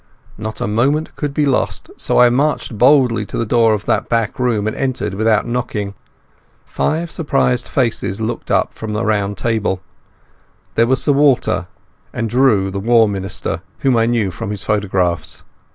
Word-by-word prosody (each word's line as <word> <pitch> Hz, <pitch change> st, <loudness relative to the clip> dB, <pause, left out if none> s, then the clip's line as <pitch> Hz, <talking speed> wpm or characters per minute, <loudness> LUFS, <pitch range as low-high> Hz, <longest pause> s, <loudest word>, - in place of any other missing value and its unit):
Not 110 Hz, 0 st, -6 dB
a -, -, 0 dB
moment 130 Hz, +9 st, 0 dB
could 145 Hz, -2 st, -3 dB
be 150 Hz, +1 st, +1 dB
lost, 135 Hz, -2 st, -1 dB
so -, -, 0 dB
I 125 Hz, -1 st, +6 dB
marched 140 Hz, -2 st, 0 dB
boldly 125 Hz, 0 st, +4 dB
to -, -, -5 dB
the 115 Hz, -, 0 dB
door 115 Hz, -1 st, +3 dB
of 105 Hz, -, -7 dB
that 110 Hz, +2 st, 0 dB
back 115 Hz, -1 st, -1 dB
room 115 Hz, -5 st, +1 dB
and 110 Hz, -, -2 dB
entered 125 Hz, -7 st, -2 dB
without 110 Hz, +1 st, +2 dB
knocking. 110 Hz, -4 st, -3 dB, 0.7 s
Five 165 Hz, +2 st, -2 dB
surprised 65 Hz, -, 0 dB
faces 95 Hz, +3 st, -1 dB
looked 115 Hz, +1 st, -4 dB
up -, -, +1 dB
from 110 Hz, -1 st, -5 dB
a 110 Hz, +2 st, -1 dB
round 100 Hz, -2 st, 0 dB
table. 110 Hz, -5 st, -1 dB, 0.9 s
There 115 Hz, +1 st, +3 dB
was 130 Hz, 0 st, +2 dB
Sir -, -, +3 dB
Walter, 140 Hz, -10 st, +2 dB, 0.5 s
and 115 Hz, -2 st, -3 dB
Drew 115 Hz, -7 st, +3 dB
the 100 Hz, -, -3 dB
War 115 Hz, +2 st, +4 dB
Minister, 95 Hz, -2 st, -3 dB, 0.2 s
whom 135 Hz, -2 st, +3 dB
I 115 Hz, 0 st, +3 dB
knew 115 Hz, -5 st, 0 dB
from 95 Hz, -, -6 dB
his 105 Hz, -2 st, -4 dB
photographs. 95 Hz, -4 st, -1 dB
115 Hz, 170 wpm, -18 LUFS, 105-125 Hz, 0.9 s, I